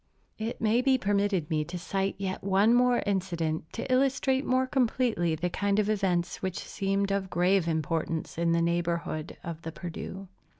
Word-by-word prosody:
It 225 +2 -3
may 225 +2 +3
be 265 0 +3
permitted 200 -6 0
me 155 -1 +1
to 180 +2 -6
cite 195 +2 -2
yet 190 -1 -4
one 200 +4 +4
more 245 0 +4
incident 170 -5 -1
to 230 - -4
illustrate 265 0 +2
more 255 +1 +3
completely 240 - +1
the 175 +3 -1
kind 200 +2 0
of 210 0 +2
events 185 -4 0
which 185 -1 -2
seemed 195 0 -1
of 195 -1 -1
grave 180 0 +2
importance 160 0 -1
in 170 0 +2
the 170 0 +2
neighborhood 170 -2 -1
of 165 -1 -6
the 165 - -5
Perdu. 180 +3 -7
190 Hz, 170 wpm, -28 LUFS, 170-215 Hz, -, one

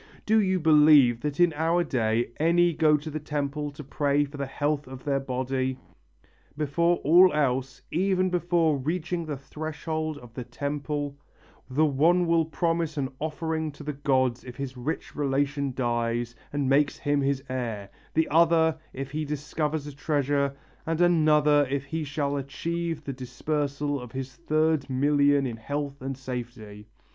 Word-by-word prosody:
Do 220 +1 +4
you 190 -2 +1
believe 150 -6 +6
that 150 0 -3
in 175 -2 +5
our 165 +3 +1
day 120 -5 0
any 170 +2 +3
go 155 -1 +4
to 155 +2 -7
the 155 - -3
temple 150 0 -3
to 150 - -9
pray 145 +1 +1
for 145 +1 -10
the 140 -1 -3
health 145 +1 -1
of 130 0 -9
their 140 -1 0
body? 130 0 -2 0.8
Before 170 +4 +2
all 180 +5 +7
else, 135 -2 -1
even 185 +1 +1
before 170 -3 +2
reaching 165 +4 -2
the 145 -2 -3
threshold 155 +2 -4
of 120 -4 -13
the 125 - -5
temple, 145 +3 -4 0.5
the 145 +5 +3
one 165 +5 +3
will 165 -1 +3
promise 165 -1 -1
an 135 -2 -1
offering 160 0 -2
to 145 - -11
the 150 0 -3
gods 130 -3 +1
if 125 -1 -9
his 135 0 -5
rich 130 +6 -4
relation 140 0 0
dies 120 -1 -1 0.2
and 145 -2 -1
makes 140 +2 +3
him 145 0 0
his 135 -1 0
heir, 115 -6 -4 0.2
the 160 0 +3
other, 160 0 +4
if 135 0 -6
he 155 +1 -2
discovers 150 +1 -2
a 145 - -7
treasure, 140 -1 0 0.3
and 165 0 -2
another 150 -4 +4
if 140 0 -2
he 160 +3 -3
shall 145 -1 -2
achieve 165 +4 -3
the 140 - -4
dispersal 140 +2 -2
of 125 -2 -10
his 130 0 -5
third 155 -2 +1
million 140 +1 +3
in 120 -3 -4
health 140 +3 -4
and 135 0 -4
safety.... 120 -5 -7
145 Hz, 160 wpm, -27 LUFS, 135-155 Hz, 0.8 s, all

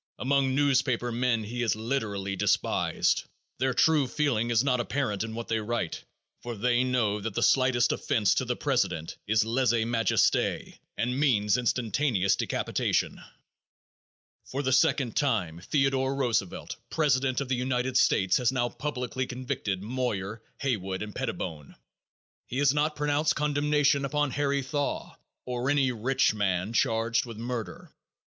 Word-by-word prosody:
Among 135 0 +1
newspaper 130 -4 +1
men 115 -1 0
he 120 +3 -4
is 115 -3 +1
literally 110 -5 -2
despised. - - +1 0.3
Their 130 0 +1
true 155 -3 +4
feeling 125 -5 0
is 115 0 +3
not 130 -2 +1
apparent 120 -4 -1
in 110 0 -6
what 115 0 -5
they 115 -1 0
write, 110 -6 -3 0.4
for 120 -1 -5
they 120 +3 +2
know 115 -5 0
that 105 -1 -4
the - - +1
slightest 130 -3 +3
offense 105 -4 +1
to 130 - 0
the 125 0 -1
president 95 - -1
is 110 0 +3
lese 120 +2 +1
majeste 115 -1 +1 0.2
and 125 +3 -1
means 105 -8 +3
instantaneous 115 -4 +1
decapitation. - - -1 1.2
For 140 +2 -4
the 130 -1 +1
second 130 -2 +2
time, 100 - 0
Theodore 135 0 +1
Roosevelt, 120 -9 -2
president 135 -4 +1
of 140 - -3
the 130 - 0
United 125 0 -1
States, 95 -7 +3
has 125 -1 +2
now 120 -2 0
publicly 130 -2 -3
convicted 115 -6 -3
Moyer, 110 -3 -3 0.2
Haywood 95 -8 -2
and 105 -1 -7
Pettibone. 75 -3 -5 0.7
He 125 - -5
has 140 -1 +3
not 150 +1 0
pronounced 150 +1 +1
condemnation 145 -1 +2
upon 145 +1 0
Harry 140 0 0
Thaw, 145 +2 -3 0.3
or 125 +1 -2
any 140 -2 +3
rich 125 +2 +1
man 100 0 -1
charged 115 +1 +1
with 115 -2 -8
murder. 115 -5 -5
125 Hz, 145 wpm, -28 LUFS, 110-135 Hz, 1.2 s, true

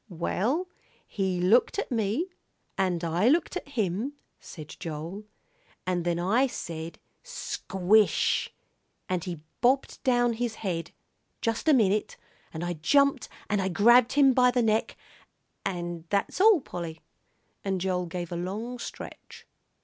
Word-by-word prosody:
"Well, 220 - -1 0.4
he 190 -3 -2
looked 210 - +3
at 405 - -3
me, 225 - 0 0.5
and 180 -3 0
I 170 +6 +1
looked 335 +5 +2
at 365 - -4
him," 220 +1 -1 0.3
said 155 -3 -10
Joel, 165 +5 -6 0.6
"and 180 -1 0
then 170 -1 +1
I 215 +10 +2
said 165 -8 -6 0.2
'Squish!' 215 - +1 0.6
and 180 -2 -1
he 175 -4 -5 0.2
bobbed 260 +3 +2
down 245 -2 +2
his 230 -1 -2
head, 170 -3 -2 0.5
just 230 +6 -2
a 310 - +7
minute, 210 -3 +1 0.3
and 160 +1 -5
I 175 - -1
jumped 280 - +2 0.2
and 205 -2 +1
I 190 - 0
grabbed 235 +6 +5
him 275 -2 +5
by 250 0 +5
the 245 -1 +1
neck, 220 0 +1 0.7
and 175 -3 -4
that's 200 - 0
all, 420 -6 +6
Polly." 165 -7 -7 0.6
And 195 -1 -1
Joel 180 -1 -1
gave 175 0 -5
a - - -3
long 210 +8 -4
stretch. - - -9
200 Hz, 140 wpm, -27 LUFS, 175-245 Hz, 0.7 s, a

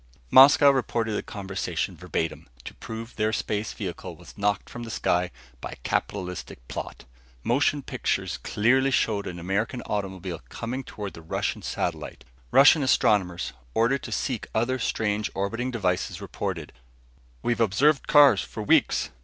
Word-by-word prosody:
Moscow 140 +2 +8
reported 120 -4 -1
the 105 - -1
conversation, 95 -2 -4
verbatim, 80 -1 -4 0.2
to - - -7
prove 115 +1 -8
their 110 0 +1
space 105 -1 -2
vehicle 90 -3 -6
was 85 +2 -15
knocked 105 0 0
from 120 - -8
the 115 - -6
sky 90 -4 0 0.3
by - - -6
a - - -16
capitalistic 90 -9 -3
plot. - - -7 0.4
Motion 140 +3 +1
pictures - - -2
clearly 130 +6 +2
showed 110 -5 +1
an 90 - -6
American 100 +8 -2
automobile 95 -4 -4
coming 125 +3 -4
toward 105 -5 -7
the 80 - -11
Russian 80 - -2
satellite. - - -4 0.2
Russian 145 - +7
astronomers 95 -9 +2 0.2
ordered 120 +4 +2
to - - -8
seek 125 -6 -2
other 125 +4 +1
strange 105 -2 -1
orbiting 115 +6 -2
devices 95 -5 -1
reported: 95 -5 -5 0.7
"We've 120 -1 0
observed 135 +8 +3
cars 140 - +7
for - - -6
weeks. - - +2
105 Hz, 145 wpm, -26 LUFS, 95-125 Hz, 0.7 s, Moscow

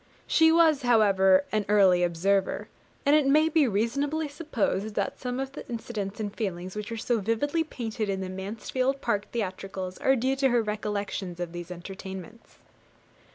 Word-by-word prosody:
She 320 0 +5
was, 320 -3 +4
however, 195 -6 +4
an 215 -1 +1
early 190 -4 +5
observer, 185 +3 +1 0.4
and 285 +1 +5
it 300 -3 +3
may 305 +3 +4
be 310 -3 +3
reasonably 280 +9 0
supposed 230 - -2
that 200 - -2
some 250 0 -3
of 270 0 -3
the - - -8
incidents 220 -4 -5
and 210 -1 -4
feelings 185 -4 -4
which 210 +2 -5
are 230 - -3
so 230 +1 0
vividly 230 - 0
painted 225 -8 -4
in 195 -1 -1
the 190 - -4
Mansfield 225 +8 -2
Park 205 -4 -1
theatricals 190 -3 -4
are 265 - +3
due 260 +2 0
to 270 -1 +3
her 240 -2 +2
recollections 205 -4 -3
of 175 -1 -4
these 175 0 -7
entertainments. 190 +4 -9
215 Hz, 165 wpm, -27 LUFS, 190-265 Hz, 0.4 s, She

